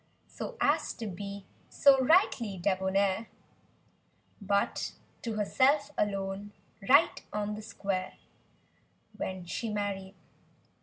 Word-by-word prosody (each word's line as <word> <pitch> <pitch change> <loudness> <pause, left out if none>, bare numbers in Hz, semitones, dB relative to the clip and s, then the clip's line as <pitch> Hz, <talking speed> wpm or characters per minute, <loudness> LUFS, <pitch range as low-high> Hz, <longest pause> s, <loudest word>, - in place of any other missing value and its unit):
So 485 - -7
as - - +2
to 230 - -7
be 200 0 -6 0.2
so 270 -2 +5
rightly 250 - +3
debonair 190 +3 +1 1.1
But 200 0 0 0.3
to 230 - -3
herself 275 +7 +2
alone, 200 0 -2 0.4
right 285 +5 +5
on 210 0 -2
the 210 - -6
square— 195 -3 -3 1.0
When 185 -1 -4
she 225 +6 -3
married. 200 -2 -3
205 Hz, 100 wpm, -30 LUFS, 195-230 Hz, 1.1 s, so